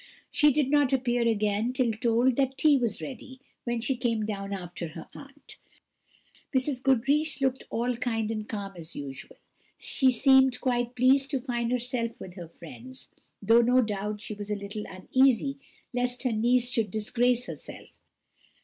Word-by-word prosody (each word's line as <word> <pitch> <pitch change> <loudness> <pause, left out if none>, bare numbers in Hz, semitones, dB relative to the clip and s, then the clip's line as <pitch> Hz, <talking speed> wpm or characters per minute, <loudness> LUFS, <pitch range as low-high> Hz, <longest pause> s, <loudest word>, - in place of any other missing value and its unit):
She 295 0 +5
did 280 -1 +1
not 290 -3 +3
appear 245 -3 +1
again 215 +2 0
till 255 -3 +1
told 235 +2 +2
that 270 -1 0
tea 305 -2 +5
was 240 -5 -1
ready, 260 0 -9 0.3
when 240 -1 -1
she 260 +3 +1
came 230 -3 -1
down 200 -2 -4
after 175 -3 -5
her 165 - -8
aunt. 280 +1 -13 1.0
Mrs. 260 -1 -1
Goodriche 275 +5 +2
looked 265 -1 0
all 240 +2 -1
kind 225 -3 -1
and 215 -1 -5
calm 200 -2 -5
as 165 -1 -9
usual; 135 -2 -8 0.4
she 265 -2 +2
seemed 265 +1 +4
quite 245 -1 -1
pleased 265 +2 +4
to 275 - -1
find 240 -2 -2
herself 245 -1 -2
with 180 - -9
her 175 -3 -9
friends, 235 - -11 0.3
though 225 +4 +6
no 250 +2 +4
doubt 210 -2 -2
she - - -4
was 205 0 -7
a 210 - 0
little 205 +1 -6
uneasy 260 +7 +1 0.3
lest 245 +1 -1
her 255 - +1
niece 240 +3 +2
should 225 -4 0
disgrace 240 +4 +1
herself. - - -10
240 Hz, 165 wpm, -27 LUFS, 215-260 Hz, 1.0 s, though